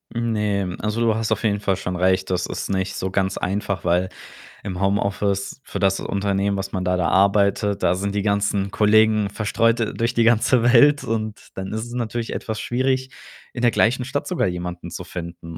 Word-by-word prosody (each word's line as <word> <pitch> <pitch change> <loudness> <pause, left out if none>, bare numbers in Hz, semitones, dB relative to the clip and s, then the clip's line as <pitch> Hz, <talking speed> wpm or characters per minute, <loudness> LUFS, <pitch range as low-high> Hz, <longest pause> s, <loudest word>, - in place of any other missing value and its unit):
Ne, 105 -5 -1
also, 105 +2 -2
du 115 -1 +3
hast 110 0 -2
auf 110 - 0
jeden 105 -2 +1
Fall 95 -2 0
schon 90 -1 -4
recht. 95 +1 +1
Das 90 0 0
ist - - -5
nicht 95 0 -1
so 95 - -3
ganz 95 -1 0
einfach, 100 -1 -2
weil 90 +2 +2 0.5
im 95 -1 -5
Homeoffice 100 +2 -1
für - - -6
das 95 0 +2
Unternehmen, 100 0 -1
was 95 - -4
man 95 - -2
da 90 0 +1
da 85 -2 +1
arbeitet, 100 +1 +2
da 85 - +4
sind 100 +2 -3
die 100 - 0
ganzen 100 -1 0
Kollegen 110 -1 +3
verstreut 115 +3 +1 0.2
durch 115 +1 0
die 115 - +3
ganze 115 +1 +3
Welt, 130 +5 +5
und 110 -1 -4
dann 95 0 -6
ist 110 +1 -3
es 120 - -9
natürlich 120 -1 -3
etwas 110 -1 -4
schwierig, 130 +2 -1 0.4
in 120 - -5
der 120 - +5
gleichen 125 +3 +2
Stadt 135 +3 -3
sogar 180 - 0
jemanden 90 -1 -5
zu 90 - -6
finden 85 -2 -8
100 Hz, 195 wpm, -22 LUFS, 95-115 Hz, 0.5 s, Welt